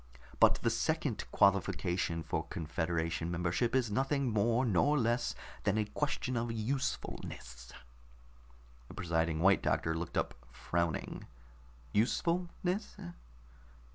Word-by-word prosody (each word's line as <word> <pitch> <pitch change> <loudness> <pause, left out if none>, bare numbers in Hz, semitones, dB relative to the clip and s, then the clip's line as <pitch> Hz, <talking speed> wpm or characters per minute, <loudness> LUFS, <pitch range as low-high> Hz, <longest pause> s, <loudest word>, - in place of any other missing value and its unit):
But - - +7
the - - +3
second - - -1
qualification 90 -3 +2
for 80 - -2
confederation 80 +1 -2
membership 85 +8 0
is 125 -5 +2
nothing 135 +2 +1
more 115 +4 +2
nor 125 +8 +3
less 120 -1 +1 0.3
than 100 - +2
a 110 - +2
question 130 +2 -2
of 115 0 -1
usefulness." 110 - -4 1.2
The - - -11
presiding 80 -2 0
White 95 +2 +5
Doctor 80 - +1
looked 85 +1 -4
up, - - 0 0.2
frowning. 80 +5 -2 0.7
"Usefulness?" 175 - 0
100 Hz, 110 wpm, -33 LUFS, 85-125 Hz, 1.2 s, But